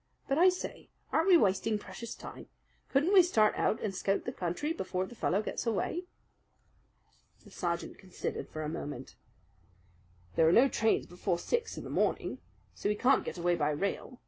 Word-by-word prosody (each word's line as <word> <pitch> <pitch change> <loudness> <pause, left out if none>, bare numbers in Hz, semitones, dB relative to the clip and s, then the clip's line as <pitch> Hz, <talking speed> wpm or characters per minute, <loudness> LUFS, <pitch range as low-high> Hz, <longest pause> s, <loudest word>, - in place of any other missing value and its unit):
"But, 275 +2 +1
I 365 +2 +8
say, 365 - -5 0.2
aren't - - +2
we 365 -3 +8
wasting 210 - +2
precious 205 +3 -8
time? - - -10 0.4
Couldn't 295 +8 +2
we 385 - +9
start 220 -12 +3
out 220 - +1
and 210 -3 -2
scout 195 +1 -1
the 250 - -2
country 190 - -2
before 185 - -2
the 215 - -11
fellow 210 -2 0
gets 235 - -4
away?" 330 - -1 1.4
The - - -16
sergeant 170 -2 -3
considered 185 -2 -5
for 155 - -5
a - - -3
moment. 150 -1 -6 1.2
"There 160 0 +5
are - - +4
no 255 +7 +7
trains 225 -3 +1
before 175 0 -2
six 470 - -2
in - - -5
the - - -7
morning; - - 0 0.3
so - - -2
he 210 - +1
can't 260 +5 +3
get - - -5
away 175 0 +2
by 150 -3 +1
rail. 200 - -3
210 Hz, 180 wpm, -31 LUFS, 175-275 Hz, 1.4 s, we